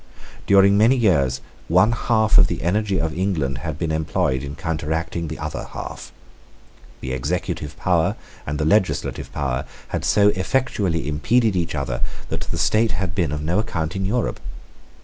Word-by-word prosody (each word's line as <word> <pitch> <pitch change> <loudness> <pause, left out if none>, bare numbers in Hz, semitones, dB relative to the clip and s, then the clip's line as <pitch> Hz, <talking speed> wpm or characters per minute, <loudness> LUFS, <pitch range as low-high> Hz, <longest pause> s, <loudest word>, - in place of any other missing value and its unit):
During 100 0 +6
many 115 +5 +5
years 75 - +2 0.3
one 95 +7 +4
half 110 -2 +3
of 90 - +6
the - - -4
energy 100 +2 +1
of 80 -1 -2
England 80 -9 -1
had 75 +1 -4
been 80 -1 -2
employed 75 -4 0
in 70 +1 -6
counteracting 80 0 -2
the 80 - -5
other 75 0 -5
half. - - -7 0.9
The 65 -1 -4
executive 75 +2 -3
power 85 -3 +1 0.3
and 75 +1 -2
the 75 - -1
legislative 95 +3 +1
power 65 -2 -2 0.3
had - - -3
so 105 0 +4
effectually 95 - 0
impeded 110 +9 +2
each 85 -3 -1
other 65 -4 -3 0.3
that - - -3
the - - -3
state 110 -3 +2
had 90 +1 -2
been 85 -6 0
of 75 0 -3
no 85 +6 +1
account 80 -5 -2
in 95 - -2
Europe. 115 +4 -1
85 Hz, 165 wpm, -22 LUFS, 75-100 Hz, 0.9 s, During